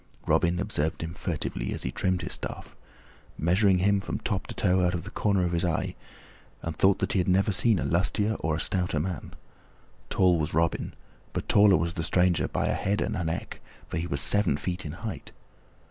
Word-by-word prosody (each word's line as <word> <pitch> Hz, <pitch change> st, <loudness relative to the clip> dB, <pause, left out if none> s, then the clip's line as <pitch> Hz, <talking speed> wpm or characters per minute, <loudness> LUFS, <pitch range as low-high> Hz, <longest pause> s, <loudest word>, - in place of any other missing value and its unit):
Robin 85 Hz, +1 st, +2 dB
observed 80 Hz, -6 st, -2 dB
him 80 Hz, +1 st, -5 dB
furtively 75 Hz, -9 st, -3 dB
as -, -, -5 dB
he 65 Hz, -, -2 dB
trimmed 95 Hz, +4 st, -1 dB
his -, -, -4 dB
staff, -, -, -7 dB, 0.6 s
measuring 95 Hz, +4 st, +3 dB
him 100 Hz, +2 st, +2 dB
from -, -, -4 dB
top -, -, -3 dB
to -, -, -7 dB
toe 90 Hz, +1 st, +2 dB
from 90 Hz, -, -1 dB
out 85 Hz, -, -7 dB
the 100 Hz, -, -9 dB
corner 100 Hz, -3 st, +1 dB
of 85 Hz, -, -1 dB
his 85 Hz, 0 st, 0 dB
eye, 85 Hz, -2 st, -1 dB, 0.7 s
and 85 Hz, -1 st, -4 dB
thought 95 Hz, +3 st, +4 dB
that -, -, -1 dB
he 95 Hz, -, +2 dB
had 90 Hz, -, 0 dB
never 95 Hz, +3 st, +3 dB
seen 110 Hz, +2 st, +4 dB
a -, -, -2 dB
lustier 100 Hz, +5 st, +1 dB
or 80 Hz, -1 st, 0 dB
a -, -, -3 dB
stouter 90 Hz, -4 st, +1 dB
man. 85 Hz, 0 st, -5 dB, 0.7 s
Tall 90 Hz, -3 st, +3 dB
was 75 Hz, -1 st, -2 dB
Robin, 85 Hz, 0 st, 0 dB, 0.4 s
but -, -, -4 dB
taller 100 Hz, -3 st, +6 dB
was 85 Hz, +2 st, -1 dB
the 85 Hz, -, -3 dB
stranger 90 Hz, +1 st, +2 dB
by -, -, -1 dB
a -, -, +1 dB
head 100 Hz, +1 st, -1 dB
and -, -, -1 dB
a 90 Hz, -, -2 dB
neck, 80 Hz, 0 st, -4 dB, 0.3 s
for -, -, -3 dB
he 85 Hz, +2 st, -2 dB
was 70 Hz, -4 st, +2 dB
seven 100 Hz, -4 st, +4 dB
feet 90 Hz, 0 st, -4 dB
in 75 Hz, -, -6 dB
height. 105 Hz, +4 st, -7 dB
90 Hz, 210 wpm, -27 LUFS, 80-95 Hz, 0.7 s, taller